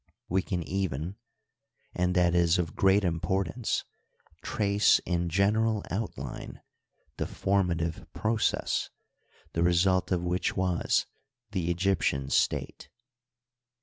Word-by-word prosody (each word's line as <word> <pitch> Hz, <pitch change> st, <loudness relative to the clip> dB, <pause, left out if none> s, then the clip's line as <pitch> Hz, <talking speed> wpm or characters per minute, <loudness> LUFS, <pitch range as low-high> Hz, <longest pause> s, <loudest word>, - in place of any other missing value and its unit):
We 95 Hz, +2 st, +1 dB
can 90 Hz, -3 st, -3 dB
even 90 Hz, 0 st, -3 dB, 0.4 s
— -, -, -39 dB
^and 90 Hz, +1 st, +1 dB
that 90 Hz, -1 st, +3 dB
is 85 Hz, 0 st, +4 dB
of 85 Hz, -3 st, -2 dB
great 95 Hz, +1 st, +4 dB
importance 95 Hz, +5 st, -1 dB, 0.3 s
— -, -, -34 dB
^trace 100 Hz, 0 st, +3 dB
in 85 Hz, -1 st, 0 dB
general 105 Hz, +4 st, +2 dB
outline 105 Hz, +4 st, -5 dB, 0.6 s
the -, -, -2 dB
formative 85 Hz, -4 st, -1 dB
process, 110 Hz, 0 st, 0 dB, 0.6 s
the 85 Hz, -, 0 dB
result 90 Hz, +2 st, +3 dB
of 90 Hz, -2 st, +1 dB
which 90 Hz, +1 st, -1 dB
was 90 Hz, -2 st, +1 dB, 0.5 s
the 90 Hz, -5 st, -1 dB
Egyptian 85 Hz, -7 st, 0 dB
state. -, -, 0 dB
90 Hz, 115 wpm, -28 LUFS, 85-100 Hz, 0.6 s, is